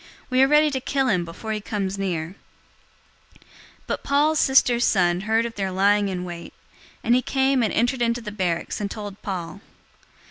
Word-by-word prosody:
We 255 +1 +4
are 270 - +6
ready 300 +1 +4
to 265 -1 -2
kill 270 0 0
him 185 -4 +1
before 175 +6 -7
he 215 -1 -2
comes 200 -2 -3
near." 175 -3 -3 1.1
023:016 - - -25 0.4
But - - -4
Paul's 300 +2 +2
sister's 250 -4 +4
son 180 -4 +2
heard 220 +3 +1
of 235 - -5
their 195 -3 -2
lying 200 +2 +2
in 180 -1 -3
wait, 170 -1 -8 0.5
and 235 - +3
he 250 - +4
came 265 0 +1
and 220 - +1
entered 245 +2 0
into 235 0 +1
the 220 -3 -7
barracks 185 -2 -2
and 200 - -2
told 205 -1 -8
Paul. 185 -1 -5
210 Hz, 185 wpm, -23 LUFS, 190-255 Hz, 1.1 s, are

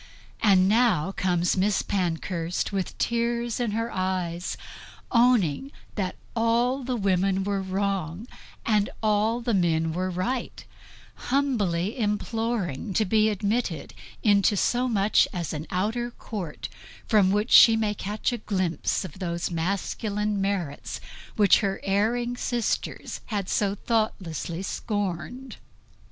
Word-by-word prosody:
And 190 -3 +5
now 215 -6 +3
comes 180 -2 +1
Miss 195 +2 +2
Pankhurst 175 -2 -2
with 195 -2 -3
tears 235 0 0
in 240 -2 0
her 230 +2 -2
eyes, 180 -2 -2 0.5
owning 240 - +3 0.2
that 190 -3 -2 0.2
all 235 +3 +2
the 250 0 -2
women 195 -2 +1
were 200 0 -1
wrong 190 -1 -2 0.4
and 210 -2 +2
all 215 +2 +2
the 235 -1 0
men 165 -4 +2
were 185 +2 -1
right; 185 +8 -3 0.6
humbly 225 -7 0
imploring 210 - -1
to 220 - +3
be 215 +2 +3
admitted 205 -4 -2 0.3
into 205 -1 +4
so 245 +6 +1
much 210 -3 +3
as 175 -6 -3
an 155 +1 -5
outer 220 +6 -1
court, 200 -9 -6 0.4
from 210 -5 +4
which 210 +4 0
she 225 - +9
may 215 -2 0
catch 210 +5 -2
a 240 - -3
glimpse 185 -3 -1
of 185 +1 -10
those 170 -2 -2
masculine 200 +4 -1
merits 185 -8 -2 0.4
which 205 -2 +5
her 195 -2 -1
erring 230 +5 +1
sisters 240 -2 -2
had 200 -4 -2
so 200 0 +1
thoughtlessly 190 -6 -2
scorned. 205 +6 -4
200 Hz, 125 wpm, -26 LUFS, 185-230 Hz, 0.6 s, she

